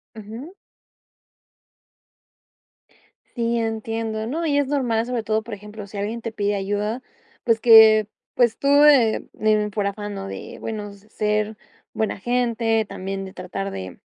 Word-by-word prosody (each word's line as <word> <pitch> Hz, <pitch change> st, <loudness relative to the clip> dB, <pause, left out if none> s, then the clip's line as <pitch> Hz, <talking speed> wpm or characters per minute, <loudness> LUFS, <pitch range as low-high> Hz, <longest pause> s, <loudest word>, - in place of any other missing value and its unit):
Ujú. 225 Hz, -, -9 dB, 2.8 s
Sí, 235 Hz, -1 st, 0 dB
entiendo, 225 Hz, -1 st, -3 dB
no, 325 Hz, +6 st, -2 dB
y 285 Hz, -2 st, +1 dB
es 285 Hz, -2 st, +2 dB
normal, 240 Hz, -5 st, 0 dB
sobre 245 Hz, -2 st, -2 dB
todo, 220 Hz, 0 st, 0 dB
por 230 Hz, -, -8 dB
ejemplo, 210 Hz, 0 st, -9 dB
sí 200 Hz, -, -9 dB
alguien 215 Hz, +4 st, -3 dB
te 230 Hz, -, -4 dB
pide 205 Hz, -1 st, -1 dB
ayuda, 205 Hz, +4 st, -2 dB, 0.4 s
pues 230 Hz, -2 st, +2 dB
que 220 Hz, -2 st, +8 dB, 0.3 s
pues 235 Hz, -3 st, +2 dB
tú, 280 Hz, -, -2 dB, 0.2 s
eh 255 Hz, -7 st, +5 dB, 0.2 s
eh, 215 Hz, -1 st, +2 dB
por 200 Hz, -1 st, 0 dB
afán, 205 Hz, +1 st, -5 dB
¿no?, 195 Hz, 0 st, -6 dB
de -, -, -8 dB
bueno 210 Hz, -2 st, -5 dB
ser 210 Hz, +1 st, -2 dB, 0.4 s
buena 220 Hz, -2 st, -1 dB
gente, 230 Hz, -1 st, +1 dB
también 195 Hz, +1 st, -5 dB
de 190 Hz, -, -10 dB
tratar 195 Hz, +2 st, -5 dB
de, 95 Hz, -1 st, -7 dB
220 Hz, 145 wpm, -22 LUFS, 205-230 Hz, 2.8 s, que